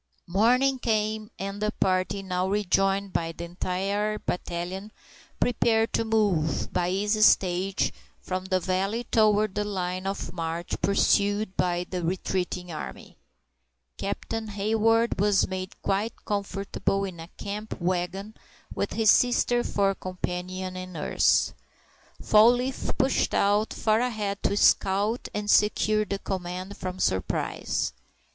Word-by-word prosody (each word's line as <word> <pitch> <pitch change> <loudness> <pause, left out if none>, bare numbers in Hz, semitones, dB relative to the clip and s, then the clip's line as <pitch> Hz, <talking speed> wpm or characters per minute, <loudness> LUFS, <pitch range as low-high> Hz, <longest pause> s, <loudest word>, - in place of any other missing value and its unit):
Morning 250 +8 +3
came, 215 -2 -1
and 195 +1 -5
the 210 - +1
party, 185 +1 +1
now 185 0 -1
rejoined 195 -1 +1
by 165 0 -1
the 165 - -8
entire 195 +4 -2
battalion, 180 +3 -4 0.5
prepared 225 -2 +2
to - - +2
move, 205 -9 +1
by 175 0 +1
easy 205 +3 0
stages, 190 -1 +3 0.3
from 185 0 -4
the 190 -1 +1
valley 195 +5 -1
toward 215 -3 +3
the 210 - -1
line 185 -2 -3
of 195 -4 -4
march 165 0 -4
pursued 200 0 +2
by 175 0 0
the 180 -1 -3
retreating 180 0 -2
army. 65 - -8 0.8
Captain 225 -1 -3
Hayward 225 +3 +1
was 205 0 +3
made 185 +1 -6
quite 200 +4 -2
comfortable 200 -1 -1
in 185 -4 -5
a 165 - -8
camp 210 +2 -5
wagon, 185 +3 -2 0.4
with - - -2
his 220 -2 +5
sister 245 0 +3
for 195 -1 +1
companion 185 0 -4
and 185 0 -7
nurse. 155 - +2 0.7
Fall 215 +2 +6
leaf 250 +1 -3
pushed 265 0 +1
out 205 +2 +2
far 215 0 +1
ahead 215 -5 -2
to 200 - 0
scout 205 +4 +3
and 210 0 -4
secure 215 +1 +3
the 200 0 -2
command 185 0 -5
from 185 0 -5
surprise. 95 - -1
195 Hz, 130 wpm, -26 LUFS, 185-215 Hz, 0.8 s, Fall